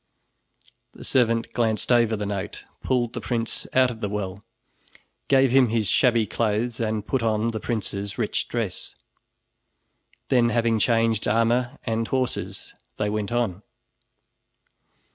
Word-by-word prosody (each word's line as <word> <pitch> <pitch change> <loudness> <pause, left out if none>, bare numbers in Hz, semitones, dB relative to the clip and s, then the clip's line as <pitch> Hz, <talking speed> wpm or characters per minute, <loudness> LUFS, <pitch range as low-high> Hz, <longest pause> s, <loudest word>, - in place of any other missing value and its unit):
The - - -12
servant 115 -2 +1
glanced 110 -1 0
over 115 -2 +4
the 105 -1 -3
note, 100 +1 -4 0.2
pulled 120 -3 0
the - - -4
prince 115 -2 -2
out 130 -1 +4
of 115 -1 -10
the 105 - -1
well, 100 -1 -4 0.8
gave 135 -2 +4
him 130 -1 +5
his 110 -2 0
shabby 120 -3 +3
clothes, 110 +4 -1
and 110 -2 -1
put 135 +2 0
on 110 0 +1
the 110 - -4
prince's 100 -4 -3
rich 110 -3 -1
dress. 115 -6 -4 1.3
Then 120 -3 +4
having 115 -1 +1
changed 115 -1 +2
armor 120 +4 +1
and 115 -1 -1
horses, 130 -2 -2 0.2
they 105 0 -1
went 105 0 -2
on. 115 -6 -1
115 Hz, 135 wpm, -24 LUFS, 105-120 Hz, 1.3 s, him